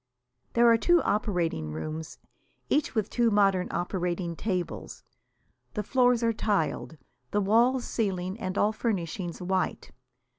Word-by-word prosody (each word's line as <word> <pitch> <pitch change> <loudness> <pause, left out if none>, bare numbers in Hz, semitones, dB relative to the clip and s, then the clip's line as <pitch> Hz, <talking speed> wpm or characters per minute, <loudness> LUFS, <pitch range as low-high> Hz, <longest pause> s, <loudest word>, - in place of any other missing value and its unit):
There 235 0 +4
are 230 -1 +6
two 345 +6 +4
operating 175 - -1
rooms, 155 - -5 0.5
each 290 -3 +1
with 215 -2 +1
two 240 0 +2
modern 195 -3 +3
operating 175 -1 -2
tables. 180 -2 -4 0.7
The 210 - -1
floors 245 +1 +3
are 230 0 +2
tiled, 195 -6 -1 0.3
the 205 - +1
walls, 240 +5 +3
ceiling 190 -2 -2
and 185 -3 -3
all 210 +1 +3
furnishings 185 -5 -3
white. 185 +1 -1
200 Hz, 125 wpm, -28 LUFS, 175-230 Hz, 0.7 s, are